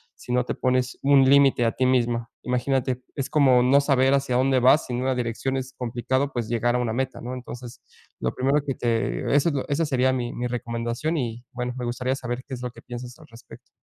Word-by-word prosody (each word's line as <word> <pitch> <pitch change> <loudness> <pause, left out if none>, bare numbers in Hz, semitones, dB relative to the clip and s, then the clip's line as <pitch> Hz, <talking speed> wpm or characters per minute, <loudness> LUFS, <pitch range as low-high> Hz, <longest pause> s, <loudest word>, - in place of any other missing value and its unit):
si - - -9
no 125 0 +3
te - - -2
pones 130 0 0
un 135 -1 +5
límite 135 -3 +5
a 115 - +2
ti 130 - 0
misma. 120 -2 +1
Imagínate, 125 0 0
es 135 -3 -2
como 130 -5 +4
no 135 +3 +5
saber 135 -1 +3
hacia 135 -3 +1
dónde 130 0 +3
vas, 130 +5 +5
sin 125 0 -3
una 130 0 0
dirección 125 +2 -2
es 130 0 -5
complicado, 130 +3 -1
pues, 120 -3 -2
llegar 120 +1 +1
a - - +1
una 120 -2 -1
meta, 130 +2 -3
¿no? 125 +2 -5
Entonces, 125 -1 -9 0.4
lo 60 - -1
primero 140 +3 +2
que 135 - -2
te 115 - -1
esa 145 +4 +4
l 140 -3 -2
esa 155 +3 +1
sería 130 -2 +2
mi 120 -2 -2
mi 125 - -3
recomendación 120 +6 -3
y 120 -3 -3
bueno, 125 0 -3
me 125 - -4
gustaría 125 +2 -1
saber, 120 -1 -5
¿qué 135 - -7
es 125 - -9
lo 125 - -3
que - - -15
piensas 120 0 -8
al 160 - -14
respecto? 115 - -15
125 Hz, 225 wpm, -24 LUFS, 120-135 Hz, 0.4 s, un